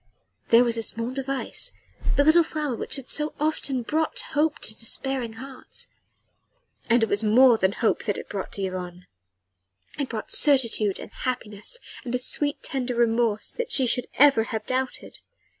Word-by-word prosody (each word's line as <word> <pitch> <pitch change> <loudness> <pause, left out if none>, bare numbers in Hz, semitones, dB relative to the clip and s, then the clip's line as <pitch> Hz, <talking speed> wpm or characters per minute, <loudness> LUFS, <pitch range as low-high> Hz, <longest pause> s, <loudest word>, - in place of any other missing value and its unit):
There 230 +1 +7
was 235 -1 0
the - - -1
small 230 +2 -2
device 270 0 -4 0.4
the 285 - +4
little 315 +3 +6
red 325 - -4
flower 300 -5 -2
which - - -3
had 270 -3 -5
so 300 0 -1
often 290 -4 -1
brought 315 +6 -1
hope 305 +1 +1
to 220 - -4
despairing 240 +1 -3
hearts. 260 +3 -9 1.0
And 235 0 +4
it - - +5
was 205 +1 0
more 235 +2 +5
than 190 +1 +2
hope 225 - 0
that 205 -3 -1
it - - -7
brought 195 -2 -5
to 200 - -4
Yvonne. 180 -1 -5 0.9
It 280 - -2
brought 220 -2 -5
certitude 230 -8 +5
and - - -9
happiness, 240 - -4 0.3
and 250 -1 -3
a - - +3
sweet, 290 +3 -1
tender 255 -2 -2
remorse 230 -2 +1
that 485 - -4
she 265 - +3
should 250 +1 +2
ever 275 -6 +6
have 220 -1 -4
doubted. 260 0 -3
245 Hz, 175 wpm, -25 LUFS, 225-275 Hz, 1.0 s, There